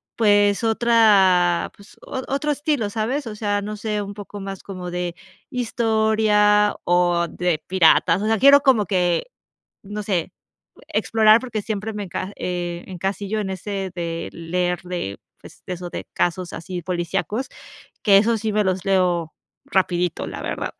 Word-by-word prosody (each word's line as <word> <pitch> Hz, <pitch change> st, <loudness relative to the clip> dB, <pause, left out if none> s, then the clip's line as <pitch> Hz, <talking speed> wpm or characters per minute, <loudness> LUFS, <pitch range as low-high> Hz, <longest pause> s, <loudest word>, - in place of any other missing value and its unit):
pues 205 Hz, -1 st, +3 dB
otra, 205 Hz, -7 st, +4 dB
pues 200 Hz, +1 st, -17 dB
o 260 Hz, -1 st, -5 dB
otro 290 Hz, +2 st, 0 dB
estilo, 285 Hz, -7 st, -1 dB
¿sabes? 235 Hz, +6 st, -2 dB
O 215 Hz, -, -6 dB
sea, 205 Hz, -1 st, -1 dB
no 210 Hz, +1 st, -5 dB
sé, 210 Hz, -1 st, -2 dB
un 200 Hz, 0 st, -6 dB
poco 205 Hz, 0 st, -9 dB
más 195 Hz, -1 st, -7 dB
como 185 Hz, -2 st, -7 dB
de 175 Hz, -1 st, -3 dB, 0.4 s
historia 220 Hz, -3 st, +2 dB
o 175 Hz, -1 st, +2 dB
de 175 Hz, -3 st, -1 dB
piratas. 180 Hz, 0 st, +4 dB
O -, -, 0 dB
sea, 220 Hz, -1 st, +2 dB
quiero 280 Hz, +4 st, +7 dB
como 255 Hz, -7 st, +4 dB
que, 180 Hz, -, +1 dB, 0.6 s
no 210 Hz, +1 st, -6 dB
sé, 190 Hz, -5 st, -2 dB, 0.6 s
explorar 220 Hz, 0 st, +4 dB
porque 225 Hz, -5 st, -4 dB
siempre 215 Hz, +1 st, -4 dB
me 210 Hz, -, -4 dB
enca 190 Hz, +2 st, -5 dB
eh, 175 Hz, -1 st, -3 dB
encasillo 195 Hz, +3 st, -3 dB
en 190 Hz, -2 st, -3 dB
ese 190 Hz, 0 st, -4 dB
de 170 Hz, -1 st, -4 dB
leer 175 Hz, +1 st, -2 dB
de, 175 Hz, -, -5 dB, 0.2 s
pues -, -, -15 dB
eso 180 Hz, -1 st, -5 dB
de -, -, -6 dB
casos 175 Hz, 0 st, -1 dB
así 175 Hz, +1 st, -6 dB
policíacos, 190 Hz, +8 st, -2 dB, 0.5 s
que 200 Hz, -2 st, +6 dB
eso 230 Hz, +3 st, +2 dB
sí 220 Hz, 0 st, -2 dB
me 210 Hz, 0 st, +2 dB
los 185 Hz, 0 st, -1 dB
leo 180 Hz, -4 st, +1 dB, 0.3 s
rapidito, 180 Hz, -2 st, 0 dB
la -, -, -6 dB
verdad. -, -, -4 dB
200 Hz, 155 wpm, -22 LUFS, 180-220 Hz, 0.6 s, quiero